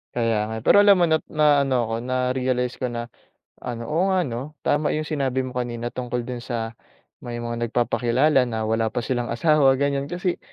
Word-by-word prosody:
Kaya 115 -2 +1
nga. 110 - -5
Pero - - +5
alam 200 -1 +7
mo - - +6
na 160 - +4
naano 145 -3 +3
ako, 115 - -2
na-realize 125 -1 0
ko 125 - -1
na 120 -1 -5 0.6
ano, 120 -1 -5
oo 165 +5 +1
nga 190 -1 +2
'no, 130 +5 -6
tama 150 +1 +2
yung 155 0 -2
sinabi 135 -4 -1
mo 125 - -8
kanina 120 -1 -3
tungkol 125 -1 -3
dun 125 -1 -5
sa 115 -2 -4 0.5
may 120 -1 -5
mga 120 0 -4
nagpapakilala 125 +4 +2
na 110 -1 -2
wala 110 0 0
pa - - -3
silang 120 0 -2
asawa, 135 +1 +3
ganyan. 140 0 -1
Kasi 175 0 -2
125 Hz, 190 wpm, -23 LUFS, 120-145 Hz, 0.6 s, alam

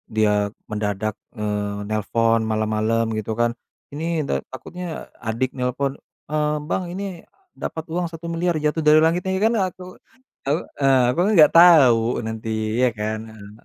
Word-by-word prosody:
dia 105 -1 +2 0.2
mendadak, 105 0 -2 0.2
eee, 105 -2 -3
nelpon 115 +2 +1
malam-malam 110 +1 0
gitu 110 +1 -3
kan, 120 0 +3 0.4
ini 155 - -5 0.2
de - - -1 0.2
takutnya 170 +6 -7 0.2
adik 115 +3 -1
nelpon, 130 +2 -1 0.3
"Eee, 150 0 0
Bang, 185 - 0
ini 190 -3 -6 0.3
dapat 160 - -5
uang 175 +2 -1
Rp1.000.000.000 170 +1 -2
jatuh 150 +1 0
dari 150 +1 +7
langit," 170 +2 +2
ya 190 - -1
ini 190 - -1
kan 225 +2 +3
aku 185 -2 -2 0.6
aku, 145 +5 +1 0.2
eee, 135 -2 +5
aku - - -2
kan 205 - +2
nggak 150 -2 +7
tahu 150 -10 +7 0.3
nanti 110 0 -5 0.4
ya - - +4
kan, 110 +1 -2
heeh. 105 -1 -12
130 Hz, 155 wpm, -22 LUFS, 110-165 Hz, 0.6 s, dari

